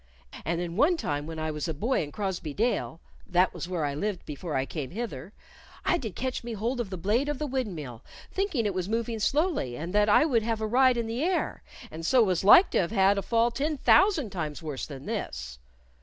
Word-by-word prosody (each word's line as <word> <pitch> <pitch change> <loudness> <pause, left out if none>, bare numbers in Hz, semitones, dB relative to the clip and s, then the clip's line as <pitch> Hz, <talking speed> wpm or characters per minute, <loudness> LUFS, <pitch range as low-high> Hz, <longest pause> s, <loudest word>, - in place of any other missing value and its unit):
And 170 +1 -1
then 175 -1 -4
one 330 +8 +4
time 145 - -3
when 160 0 -6
I 155 0 -2
was 150 +1 -4
a 160 - -3
boy 235 - 0
in 145 - -5
Crosbey 185 -7 -4
Dale 225 -7 -1 0.3
that 180 0 +3
was 175 0 -6
where 170 -5 -1
I 140 - -2
lived 185 +5 -3
before 150 +2 -5
I 130 0 +1
came 140 -3 -5
hither 195 - -6 0.5
I 345 - +2
did 220 - -6
catch 255 +3 -3
me 235 0 -5
hold 230 +4 -2
of 235 -5 -2
the 190 - -5
blade 220 - +1
of 295 - -2
the 300 - -3
windmill, 175 - -4 0.3
thinking 380 - -1
it 205 - 0
was 185 +1 -3
moving 230 0 -1
slowly, 280 - 0
and 170 +4 -5
that 210 0 +3
I 255 - +6
would 245 -8 +2
have 225 0 -1
a 220 - -1
ride 250 +2 +4
i' 235 - 0
th' 225 - -5
air, 355 +2 -1 0.3
and 160 +1 -7
so 245 +8 +4
was 185 -4 0
like 280 - +8
to - - +2
have 170 - +1
had 200 -1 +3
a - - -2
fall 230 +3 +2
ten 290 +5 -1
thousand 265 - +4
times 155 -4 -4
worse 150 -4 -4
than 140 -2 -9
this." 60 0 -5
200 Hz, 230 wpm, -28 LUFS, 160-240 Hz, 0.5 s, like